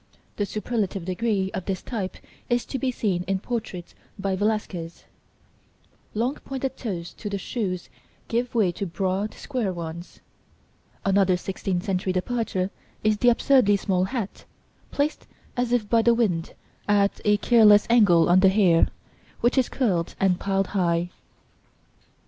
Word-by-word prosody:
(The 205 - -1
superlative 210 -4 -2
degree 190 +1 -1
of 185 - -4
this 190 -2 -3
type 205 -6 -4 0.3
is 240 -1 +1
to 265 - -4
be 265 - 0
seen 205 -7 -1
in 195 0 +1
portraits 195 -5 -5 0.2
by 195 -1 -1
Velasquez 205 -5 -1
(see - - -24
Plate - - -33 1.0
IX).) - - -2
Long 245 +4 +1
pointed 265 -1 -4
toes 180 -8 -5
to 210 - -6
the 200 - -2
shoes 190 -3 -3 0.4
give 240 +1 -1
way 205 -6 +3
to 195 +3 -4
broad, 190 +4 -2
square 250 -8 -2
ones. 170 0 -7 0.9
Another 195 -2 +3
sixteenth 185 -1 -3
century 190 -2 -1
departure 195 -1 -1 0.3
is 215 0 +3
the 245 - +5
absurdly 235 -4 +4
small 185 -2 0
hat, 205 -1 -5 0.4
placed 290 +2 -2 0.3
as 245 -1 -1
if 240 -4 +1
by 230 +1 +4
the 235 +1 +4
wind, 180 -8 0 0.3
at 200 -1 +2
a 210 0 +4
careless 210 -2 +6
angle 200 -8 +5
on 180 +1 +5
the 190 0 +6
hair, 190 -4 +4 0.5
which 240 - +3
is 260 -2 +2
curled 185 -10 0
and 185 -2 +2
piled 195 0 0
high. 175 -2 +1
200 Hz, 155 wpm, -25 LUFS, 185-230 Hz, 1.0 s, careless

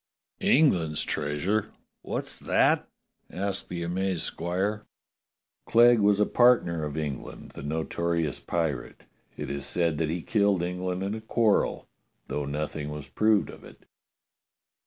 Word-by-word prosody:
"England's 85 - +3
treasure? 95 +9 -1 0.3
What's - - -3
that?" - - +2 0.4
asked 100 +1 -2
the 85 -1 -4
amazed 90 0 -1
squire. 95 +5 -2 0.8
"Clegg 120 0 +6
was 100 0 +3
a 105 - +4
partner 115 -11 +3
of 75 +1 -5
England, 75 -4 -5
the - - -9
notorious 80 +1 -1
pi 85 -2 0
rate. 65 -5 -8 0.3
It - - -4
is 70 -1 -3
said 85 +1 0
that 80 -2 0
he 85 0 -3
killed 100 -5 +2
England 90 +1 -2
in 100 +1 -2
a 110 - -5
quarrel, 110 -1 +1 0.4
though 75 - -2
nothing 75 +1 -3
was 75 -1 -7
proved 110 -2 +2
of - - -14
it. - - -15
85 Hz, 135 wpm, -27 LUFS, 75-105 Hz, 0.8 s, Clegg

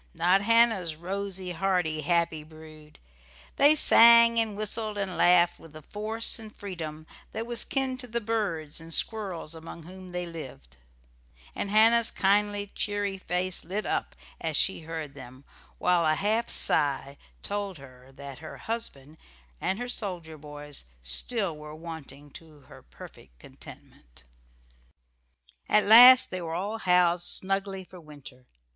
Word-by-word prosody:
Not 180 +4 +3
Hannah's 220 -6 +3
rosy, 190 +2 -5
hearty, 175 -3 -1
happy 165 -1 0
brood. 155 -1 -15 0.6
They 290 +2 +6
sang 235 -4 +7
and 220 -3 -2
whistled 215 0 -3
and 195 -3 -3
laughed 175 0 +4
with 160 -1 -16
a 155 - -11
force 220 +6 -3
and 220 -1 -10
freedom 160 -6 -7 0.3
that 225 +1 -4
was 235 -1 0
kin 265 -2 -2
to 250 - -7
the 235 0 -2
birds 195 -9 -3
and 165 0 -12
squirrels 185 -5 -1
among 165 0 -10
whom 185 +2 -12
they 180 0 -4
lived; 130 - -10 0.8
and 200 - -4
Hannah's 225 +2 +4
kindly, 205 +1 0
cheery 205 -2 -3
face 180 0 -3
lit 195 +6 -4
up - - -3 0.2
as 160 -2 -1
she 190 - +2
heard 160 -3 -7
them, 130 -1 -13 0.3
while 180 -1 +2
a 155 -1 +2
half 220 +6 -1
sigh 140 -2 0 0.3
told 200 -3 -4
that 135 0 -12
her - - -10
husband 160 -10 -7 0.4
and 190 - -1
her 245 +1 -5
soldier 180 -9 -5
boys 145 - -9
were - - -31
still 195 - -1 0.2
wanting 145 -3 -10
to 155 -2 -14
her - - -16
perfect - - -15
contentment. - - -15 1.5
At 210 - +4
last 245 +4 +9
they 185 -1 -4
were 165 -1 -5
all 205 +5 -3
housed 180 -2 +2
snugly 195 0 -1
for 180 0 -14
winter. 145 -5 -14
180 Hz, 140 wpm, -27 LUFS, 155-210 Hz, 1.5 s, last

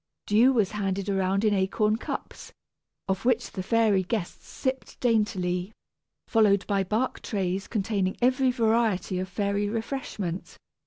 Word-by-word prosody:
Dew 230 +6 +5
was 215 -7 +2
handed 200 -1 -2
around 195 +1 +1
in 210 - +3
acorn 210 +3 +1
cups, - - -6 0.6
of 190 -1 -1
which 245 -1 +1
the 190 - -4
fairy 215 -1 +3
guests 185 -1 -4
sipped 260 -1 -4
daintily, 205 -5 0 0.5
followed 205 -4 +3
by 200 -2 +1
bark 220 +7 -1
trays 190 -2 -2
containing 200 -3 -1
every 255 +1 +3
variety 225 -6 +1
of 185 0 -4
fairy 200 +1 -1
refreshment. 220 -6 -4
205 Hz, 135 wpm, -27 LUFS, 190-230 Hz, 0.6 s, Dew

